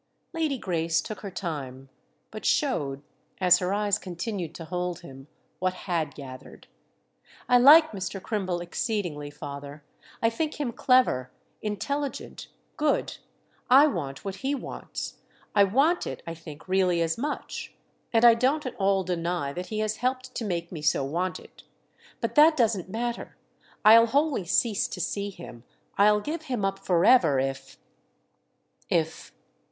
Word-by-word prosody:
Lady 315 -4 0
Grace 165 -5 0
took 215 +6 -5
her 200 - -6
time—but 145 +2 -8
showed, 145 - 0 0.4
as 180 -1 +6
her 180 0 -1
eyes 205 0 +1
continued 175 -2 -5
to 165 - -7
hold 180 0 -3
him, 135 -4 -12 0.3
what 185 0 0
had 160 -7 -1
gathered. 130 -3 -11 0.8
"I 245 - +5
like 310 +5 +8
Mr. 195 -1 -4
Crimble 185 -4 -2
exceedingly, 175 - -3
father—I 145 +9 -6
think 305 +5 -3
him 275 -5 -1
clever, 250 - +2 0.3
intelligent, 275 +7 -4 0.3
good; 300 -1 0 0.5
I 270 +4 +8
want 165 - -3
what 195 -1 -4
he 270 +7 -1
wants—I 205 -5 -3
want 280 - +2
it, - - -6
I 165 - -5
think, 160 -1 -12
really, 185 -2 +2
as 165 0 0
much; 290 +5 -5 0.4
and 230 0 +4
I 235 - +9
don't 265 +6 +1
at 255 - -4
all 195 -1 +2
deny 170 -4 -2
that 180 +3 -5
he 215 -1 -3
has 215 0 -1
helped 255 +1 -2
to - - -4
make 170 -5 -3
me 165 -4 -6
so 150 -2 +2
want 175 +7 -2
it. - - -16 0.6
But - - -2
that 310 +1 +6
doesn't 215 -7 +1
matter. 235 +3 -4 0.5
I'll 230 +2 +8
wholly 280 - +1
cease 210 +4 +1
to - - -7
see 200 0 -2
him, 170 -11 -11 0.3
I'll 210 +1 +4
give 310 +5 -5
him 245 -7 -2
up 195 0 -2
forever, 175 - +4
if—if—!" 135 +4 -6
195 Hz, 145 wpm, -27 LUFS, 165-240 Hz, 0.8 s, I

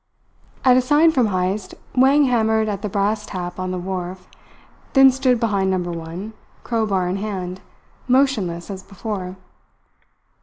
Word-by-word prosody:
At 255 -1 +6
a - - +5
sign 295 +5 +4
from 255 -7 +2
Heyst, 185 +1 -2 0.2
Wang 270 +3 +5
hammered 220 -3 +2
at 200 -2 -3
the 210 - -3
brass 205 +2 0
tap 180 -1 -5
on 185 0 -2
the 185 - -3
wharf, 180 0 -5 0.7
then 270 -1 +7
stood 255 -2 +1
behind 200 -4 +1
Number 180 -2 -1
One, 170 +6 -6 0.3
crowbar 210 -6 0
in 185 +2 -1
hand, 190 -3 -4 0.5
motionless 220 -10 +1
as 190 -1 -6
before. 195 -1 -6
200 Hz, 145 wpm, -21 LUFS, 185-240 Hz, 0.7 s, then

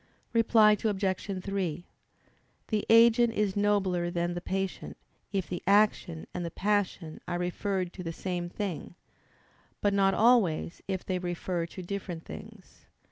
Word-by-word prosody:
Reply 220 -2 +5
Obj. 195 -2 -1
3: 180 -4 -2 0.8
The 215 -2 0
agent 230 +1 +6
is 210 -3 0
nobler 195 -4 +1
than 175 0 -1
the 175 - -4
patient, 190 0 -3 0.3
if 195 -3 -1
the 180 - -4
action 200 -5 +3
and 180 - -3
the 170 - -3
passion 190 -4 -1
are 175 - -1
referred 180 +1 -2
to 180 - -7
the 165 - -3
same 175 0 -4
thing: 180 -3 -5 0.8
but 205 -1 +1
not 195 -1 +3
always, 215 -9 +3
if 190 -2 -3
they 185 -1 -1
refer 175 -1 -2
to 185 +2 -9
different 175 -3 -5
things. - - -12
190 Hz, 140 wpm, -29 LUFS, 175-205 Hz, 0.8 s, agent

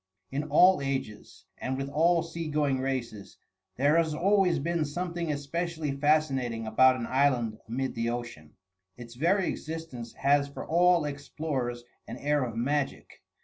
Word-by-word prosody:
In 140 +3 -2
all 180 +5 +5
ages 135 -6 -5
and 130 0 -3
with 135 0 -3
all 165 +4 +2
sea 165 0 -5
going 145 -3 +1
races 120 -7 -4 0.4
there 145 +5 +3
has 160 -2 +1
always 190 0 +3
been 165 +3 -1
something 170 +2 -3
especially 155 +2 -3
fascinating 135 -5 +1
about 130 +4 +5
an 120 -2 -4
island 125 -4 +1
amid 130 +4 -2
the 115 0 -1
ocean. 120 -11 -6 0.4
Its 120 -1 -10
very 175 +9 +1
existence 155 -8 -6
has 140 +1 +2
for 140 - -8
all 175 -1 +3
explorers 140 -4 -4 0.2
an - - -7
air 145 -1 +1
of 115 -3 -4
magic. 135 +4 -2
140 Hz, 145 wpm, -28 LUFS, 125-160 Hz, 0.4 s, all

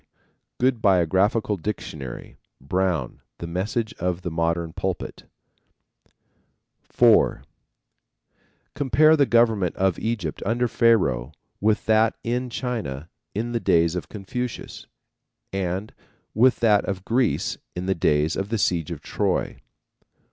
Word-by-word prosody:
good 125 -2 +2
Biographical 100 +3 +2
Dictionary; 80 - -6 0.2
Brown, 85 -2 -1 0.2
The - - -6
Message 100 +6 -2
of 90 0 -2
the 90 - -3
Modern 85 0 -1
Pulpit. 95 -1 -4 1.6
(4) - - +3 1.3
Compare 155 +3 +4
the 140 -3 +3
government 110 -7 +3
of 95 -2 +1
Egypt 115 0 -3
under 120 +4 +1
Pharaoh 75 - +2 0.3
with 105 +1 +1
that 110 0 +3
in 125 +2 -2
China 110 - -4 0.3
in 115 +3 -2
the 120 - 0
days 85 -5 +3
of 90 - -5
Confucius 115 +4 -6 0.7
and 95 +2 -3 0.4
with 125 +3 +3
that 105 -3 +4
of 95 -1 -4
Greece 120 0 0 0.2
in 90 +1 -4
the 95 - +2
days 75 -2 +1
of 95 +1 -3
the 115 - 0
siege 85 -6 0
of 85 -4 -6
Troy. - - -1
95 Hz, 120 wpm, -24 LUFS, 85-115 Hz, 1.6 s, Compare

